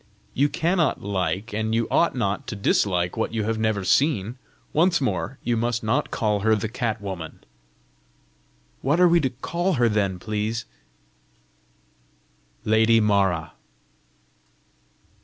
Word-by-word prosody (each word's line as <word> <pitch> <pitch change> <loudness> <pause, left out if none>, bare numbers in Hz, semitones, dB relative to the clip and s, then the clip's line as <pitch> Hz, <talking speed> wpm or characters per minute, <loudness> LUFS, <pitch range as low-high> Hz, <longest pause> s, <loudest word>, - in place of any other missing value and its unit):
"You 145 +3 +2
cannot 170 +1 0
like, 95 +1 -2
and 110 +1 -1
you 115 0 +1
ought 170 - +2
not 100 -5 -2
to 125 - -4
dislike 90 -3 +1
what 115 0 -2
you 110 - 0
have 110 +1 -1
never 110 -3 0
seen. 125 -1 +1 0.3
Once 170 +3 +3
more, 135 0 -2
you 120 - 0
must 115 0 -1
not 110 +3 0
call 105 -3 0
her 110 +2 +3
the 105 +1 -2
cat 115 -1 -2
woman!" 95 -5 -7 1.4
"What 145 +6 +1
are 180 - +7
we 170 0 +4
to 135 -4 0
call 175 +9 -2
her 120 -5 +3
then, 100 -4 0
please?" 110 +3 -3 2.0
"Lady 110 +1 +4
Mara." 100 -6 +1
110 Hz, 135 wpm, -24 LUFS, 100-130 Hz, 2.0 s, are